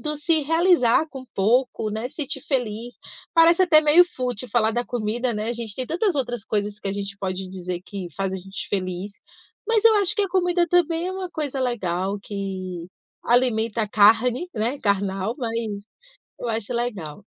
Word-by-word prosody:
do 300 -1 -1
se 315 +2 +2
realizar 325 -3 +3
com 265 -2 -9
pouco, 225 +2 +1
né, 220 +4 -3
sentir 290 -2 -4
feliz. 240 -3 -2 0.4
Parece 335 +2 +6
até 325 -4 +6
meio 310 +4 +6
fútil 250 -7 -4
falar 225 -2 +3
da 240 +1 -1
comida, 240 +1 -1
né, 215 +2 -3
a - - 0
gente 230 -3 -5
tem 255 -1 -3
tantas 360 +3 0
outras 245 -5 -2
coisas 205 0 -2
que - - -3
a - - -1
gente 200 0 -4
pode 190 -1 -4
dizer 180 -1 -5
que 190 -4 -6
faz 195 -1 -2
a - - -2
gente 195 +1 -6
feliz, 185 0 -3 0.5
mas 455 -1 +2
eu 450 -1 +7
acho 400 -3 +2
que 415 - +3
a 395 - -1
comida 355 -1 +2
também 340 0 +2
é - - -3
uma 375 -1 -5
coisa 285 -5 -3
legal, 195 -5 -1
que 190 -4 -5 0.4
alimenta 230 -2 +2
a 210 - -3
carne, 230 - +4
né, 235 +5 -1
carnal. 200 +1 0
Mas, 230 -3 -2 0.7
eu 240 - -4
acho 225 +1 -2
legal. 205 -8 -4
235 Hz, 185 wpm, -23 LUFS, 200-300 Hz, 0.7 s, eu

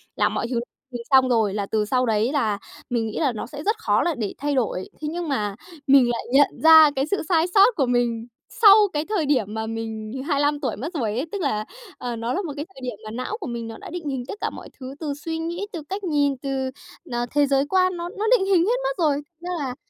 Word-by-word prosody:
làm - - +1
mọi - - -2
thứ 240 -2 0 0.3
thứ 245 - -4
xong 260 -1 +6
rồi, 220 -5 +2
là 205 -1 -2
từ 210 0 0
sau 255 +3 +1
đấy 220 +3 +1
là 220 -9 +1 0.3
mình 230 -2 0
nghĩ 220 - -4
là 285 -5 +2
nó 215 - -5
sẽ 295 0 -8
rất 430 +2 +1
khó - - +2
là 340 -3 0
để 215 -4 -3
thay 290 0 -1
đổi. 215 -7 -1
Thế 300 - -3
nhưng 345 -1 -4
mà 210 -7 -1 0.3
mình 265 -3 +6
lại 235 - -3
nhận 285 +1 +3
ra 320 -2 +9
cái 270 +1 +1
sự 400 - +1
sai 330 -1 +4
sót 410 +4 +6
của 275 - +2
mình 240 -1 0 0.3
sau 405 -2 +10 0.2
cái 300 +1 -1
thời 375 -8 0
điểm 240 -8 +1
mà 220 0 -3
mình 220 -1 -5 0.2
25 290 -1 +1
tuổi 255 -7 -2
mất 295 - -6
rồi 225 -8 -1
ấy, 275 - -1
tức 405 -3 -3
là, 215 -8 -1 0.3
à, 245 -1 -4
nó 230 +2 -2
là 390 - -1
một 320 -6 -5
cái 295 +2 -4
thời 265 - -12
điểm 250 -2 -4
mà 215 - -6
não 255 - -4
của - - -5
mình 235 -1 -4
nó 225 - -8
đã - - -10
định 335 -4 -5
hình 260 -2 -3
tất - - -5
cả - - 0
mọi - - -10
thứ 260 +1 -7
từ 300 -3 -3
suy 320 +3 -5
nghĩ, 340 +4 -3
từ 320 -4 -6
cách 395 +2 -4
nhìn, 285 -6 +1
từ, 265 -1 -2 0.4
à, 240 0 -1
thế 290 -1 +3
giới 275 0 +2
quan, 370 -1 +2
nó 345 +1 -4
nó 420 +2 -4
định 385 - -1
hình 370 -3 +3
hết 475 +4 +2
mất - - -1
rồi, 290 -2 +3 0.2
ra 350 +1 -7
là 260 -3 -3
275 Hz, 260 wpm, -23 LUFS, 235-330 Hz, 0.4 s, sau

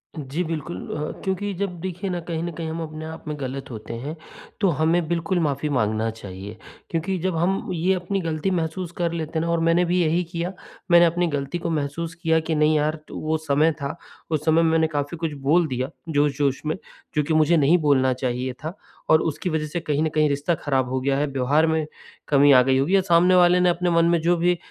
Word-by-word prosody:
जी 150 +4 -3
बिल्कुल 155 - -4 0.2
अ, 150 0 -3
क्योंकि 195 +1 -2
जब 180 -2 -4
देखिए 185 +2 -4
ना 180 - -2
कहीं 165 -1 -2
न 175 - -3
कहीं 165 0 -5
हम 165 +1 -4
अपने 155 0 -7
आप 160 0 -8
में 150 - -3
गलत 135 +1 -5
होते 110 +1 -7
हैं, 140 +7 -5 0.5
तो 195 - +4
हमें 165 +2 +1
बिल्कुल 170 +2 0
माफ़ी 150 -2 -1
माँगना 110 -4 0
चाहिए, 100 -1 -9 0.3
क्योंकि 175 +3 -1
जब 185 0 -1
हम 185 +5 0
ये 180 +3 +1
अपनी 190 +2 -2
गलती 165 +2 -1
महसूस 175 0 -2
कर 170 -1 0
लेते 160 -1 -3
हैं 160 - -1
ना 170 - 0
और 170 - +1
मैंने 165 +2 +3
भी 180 +1 +1
यही 170 +2 +2
किया 175 +2 -3 0.4
मैंने 175 0 +8
अपनी 175 +1 +1
गलती 145 +1 -2
को 170 - -3
महसूस 160 +2 -2
किया 165 -1 +1
कि 160 0 -2
नहीं 150 +1 +3
यार 150 +1 +1
तो - - -8
वो 155 +1 0
समय 155 +1 +2
था 140 +3 -3 0.4
उस 155 -1 -1
समय 160 +1 +4
मैंने 160 -1 +3
काफ़ी 145 +2 -3
कुछ 160 -2 -3
बोल 165 +1 +4
दिया 130 0 -2 0.2
जोश-जोश 145 -2 +1
में, 155 +3 -1 0.4
जो 150 - +2
कि 160 - -1
मुझे 155 +2 +4
नहीं 155 +4 +4
बोलना 130 -3 +3
चाहिए 125 0 -2
था 165 +6 -5 0.3
और 155 - +6
उसकी 165 +3 -2
वजह 155 -1 -1
से 175 +3 -3
कहीं 150 -3 -1
न 160 - +1
कहीं 155 -1 +3
रिश्ता 145 +5 0
खराब 135 -4 -1
हो 130 0 -1
गया 135 +1 +1
है, 150 - +1
व्यवहार 140 +3 +2
में 160 -1 +1 0.4
कमी 145 0 +5
आ 130 -2 +8
गई 130 +1 +2
होगी 145 +9 +2
या 195 - +5
सामने 180 0 +4
वाले 180 0 +5
ने 180 0 +4
आपने 175 +1 0
मन 170 -1 +3
में 170 0 +3
जो 175 +2 +3
भी 175 +1 +2
160 Hz, 230 wpm, -23 LUFS, 145-170 Hz, 0.5 s, मैंने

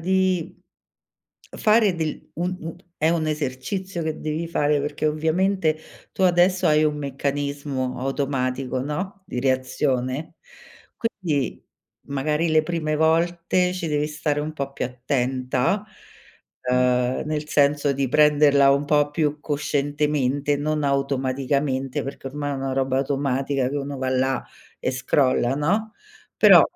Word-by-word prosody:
di 185 -1 0 1.0
fare 215 -4 +4
del 160 -2 -4
un 180 +2 -2
un 165 +1 -6 0.2
è 155 - +2
un 165 -2 0
esercizio 155 +6 -3
che 155 -1 -3
devi 155 +2 -2
fare, 150 -3 +1
perché 145 +2 -2
ovviamente 160 +2 +1 0.4
tu - - -3
adesso 180 0 +4
hai 155 0 +4
un 150 -1 +1
meccanismo 140 -1 -3
automatico, 130 -1 -1
no, 185 +8 -4
di 125 - -3
reazione. 130 +1 -1 0.6
Quindi, 175 - -2 0.4
magari 150 +4 0
le 155 0 +4
prime 155 -1 -2
volte 170 +3 +2
ci 180 -3 -3
devi 150 0 0
stare 150 -1 -2
un 155 +1 -4
po' 140 -2 -4
più - - -3
attenta, 130 - -1 0.8
ehm, 125 0 +1
nel 150 0 -3
senso 145 -1 +3
di 135 -1 -1
prenderla 145 -1 +5
un 140 +1 +2
po' 145 0 +2
più 150 -1 -1
coscientemente, 145 -1 0
non 150 +1 -1
automaticamente, 135 0 0
perché 135 0 -6
ormai 145 +1 -3
è - - -2
una 135 0 -3
roba 135 0 +1
automatica 135 -1 0
che 140 - -3
uno 140 -1 -4
va 130 0 -1
là 130 +1 0 0.3
e 130 - -1
scrolla, 130 -1 +2
no, 205 +9 0 0.4
però - - +8
145 Hz, 130 wpm, -23 LUFS, 135-160 Hz, 1.0 s, però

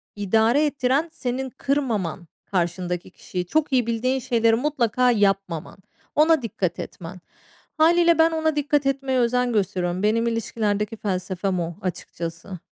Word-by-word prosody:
idare 225 +8 +3
ettiren 280 +2 0
senin 260 -2 -3
kırmaman 235 - -2 0.2
karşındaki 175 -1 -2
kişiyi. 180 -1 -5
Çok 300 - 0
iyi 245 -3 +3
bildiğin 255 +3 0
şeyleri, 230 -3 +2
mutlaka 250 -2 +1
yapmaman. 195 -7 0 0.4
Ona 315 0 +4
dikkat 190 -7 -3
etmen. 180 +2 -8 0.6
Hâliyle 335 +1 +4
ben 325 +1 +5
ona 315 -1 0
dikkat 290 -1 +1
etmeye 270 -1 0
özen 245 0 +1
gösteriyorum. 185 -3 -1
Benim 230 +2 +2
ilişkilerdeki 220 -2 -1
felsefem 185 -1 -2
o, 170 0 -3
açıkçası. 170 0 -6
230 Hz, 125 wpm, -23 LUFS, 190-270 Hz, 0.6 s, ben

